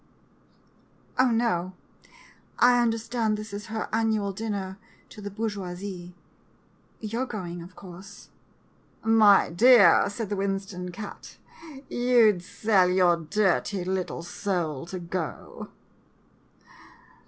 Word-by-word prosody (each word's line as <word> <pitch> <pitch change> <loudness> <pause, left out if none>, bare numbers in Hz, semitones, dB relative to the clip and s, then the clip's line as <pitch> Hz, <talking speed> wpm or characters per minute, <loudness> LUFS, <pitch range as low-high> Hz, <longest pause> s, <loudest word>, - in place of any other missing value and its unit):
Oh, 255 0 +5
no 205 -6 0 0.4
— - - -24
I 245 0 +5
understand 225 -1 0
this 215 0 -8
is 205 +2 -6
her 220 0 -4
annual 220 -3 +1
duty 220 +4 -6
dinner 190 -1 -4 0.3
to 210 - -12
the 205 - -5
bourgeoisie 190 -4 -5 0.4
— - - -36
you 225 +2 -4
're 260 - -1
going, 175 -7 -6
of 180 +2 -12
course." 195 +2 -12 0.7
"My 220 -4 +5
dear," 205 -1 +6
said 205 0 -5
the 205 - -1
Winston 195 -2 -3
cat, 205 +3 -9 0.3
" - - -12 0.2
you 240 -3 +4
'd 180 - -8
sell 190 0 +2
your 180 -1 +4
dirty 190 +2 0
little 185 -2 -3
soul 170 -6 -3
to 185 - -6
go 170 -2 -6
200 Hz, 125 wpm, -26 LUFS, 180-220 Hz, 0.7 s, dear